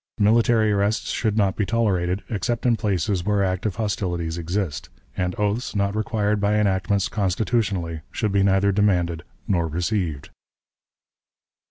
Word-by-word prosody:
Military 110 +1 +3
arrests 100 +2 0
should 110 -2 -1
not 100 -3 +2
be 105 - 0
tolerated, 95 -4 0
except 115 +3 -2
in 120 -2 +4
places 95 -3 -1
where 105 +1 +1
active 95 +1 -1
hostilities 90 -6 -2
exist; 85 -2 -3 0.3
and 90 0 -1
oaths, 105 +4 -1
not 100 0 0
required 105 -1 0
by 105 +1 +2
enactments 100 -1 +1
constitutionally, 95 -4 -1
should 105 -3 -1
be 100 0 +2
neither 100 +1 +3
demanded 90 -5 +1 0.3
nor 85 -5 +1
received." 85 -2 -2
100 Hz, 135 wpm, -23 LUFS, 90-105 Hz, 0.3 s, in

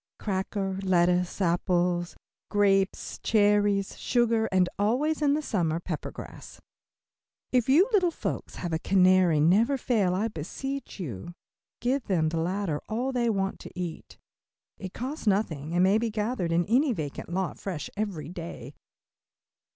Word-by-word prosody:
Cracker, 195 -1 -2
lettuce, 180 -1 +2
apples, 175 0 +1 0.3
grapes, 195 -2 +1
cherries, 205 -2 +2
sugar, 230 -2 +1
and 185 -1 +3
always 275 +10 +1
in 290 -1 +3
the 305 - -2
summer, 170 - 0
pepper 170 -3 -5
grass. - - -10 0.9
If 250 -1 +2
you 330 +10 +6
little 370 -4 +4
folks 335 - -5
have 175 -2 -4
a 160 - 0
canary 185 -3 +4
never 210 - +4
fail, 210 -8 +1
I 210 +4 0
beseech 250 - -6
you, 120 - -5
to 175 - -8 0.5
give 255 +1 0
them 175 -5 +2
of - - +2
the 165 - -1
latter 175 -2 -1
all 245 +5 -1
they 240 -2 +1
want 195 -3 -1
to 180 - -10
eat. 175 -3 -6 0.6
It 190 -1 -7
costs 265 +1 -5
nothing 170 -6 0
and 180 - +4
may 195 +3 +4
be 230 0 -1
gathered 210 -4 -2
in 170 +1 +2
any 255 +5 +3
vacant 150 -6 -5
lot 185 +1 -2
fresh 180 -7 -4
every 195 -8 -3
day. 170 -1 -8
195 Hz, 150 wpm, -27 LUFS, 175-230 Hz, 0.9 s, you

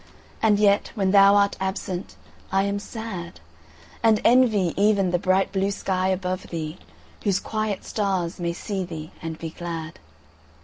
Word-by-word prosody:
And 215 -2 +4
yet 205 -1 +3
when 195 -3 +1
thou 200 0 +7
art 200 0 +3
absent 190 -1 -4 0.4
I 195 0 +3
am 200 0 -1
sad; 200 - -7 0.6
And 220 -2 +4
envy 225 -8 +4
even 200 -2 +3
the 175 - +1
bright 185 +2 +2
blue 195 0 0
sky 190 -2 -1
above 185 0 -2
thee, 160 0 -5 0.4
Whose 200 -2 +2
quiet 215 -3 -3
stars 190 -4 -1
may 170 -1 -1
see 195 +2 -3
thee 160 -3 -7
and 160 -1 -5
be 165 -1 -6
glad. 165 -2 -6
190 Hz, 150 wpm, -24 LUFS, 175-205 Hz, 0.6 s, thou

